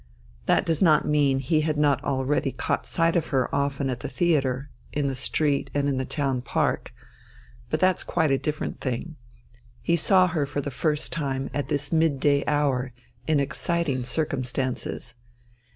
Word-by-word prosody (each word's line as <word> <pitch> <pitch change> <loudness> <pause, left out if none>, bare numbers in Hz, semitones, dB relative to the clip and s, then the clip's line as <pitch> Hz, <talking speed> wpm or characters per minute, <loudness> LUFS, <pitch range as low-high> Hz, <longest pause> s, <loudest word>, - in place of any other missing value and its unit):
That - - +3
does 165 -2 0
not 155 -5 +4
mean 145 -3 +3
that 135 - -3
he 155 +4 +2
had 155 -1 0
not 145 -2 +2
already 135 0 0
caught 130 - -2
sight 165 0 +2
of 170 - +1
her 130 -3 0
often 140 0 0
at 125 -2 -2
the - - -5
theatre, 140 -3 0 0.2
in 145 -1 0
the 135 - -1
street, 140 +2 0
and 145 0 +1
in 140 -2 0
the 130 - -1
town 135 -4 -1
park. 125 - -1 0.8
But 155 - 0
that's 185 0 +2
quite 160 -4 +1
a 135 - +4
different 150 0 -3
thing. 135 +5 -3 0.6
He 170 - +1
saw 185 +3 +5
her 160 -5 -1
for 145 - -3
the 145 0 -3
first 150 +2 -1
time 135 -4 -2
at 145 - -2
this 145 0 -1
midday 145 -3 +2
hour 135 -4 +1 0.3
in 155 -2 +3
exciting 145 -1 -1
circumstances. 130 -3 -3
145 Hz, 170 wpm, -25 LUFS, 135-155 Hz, 0.8 s, saw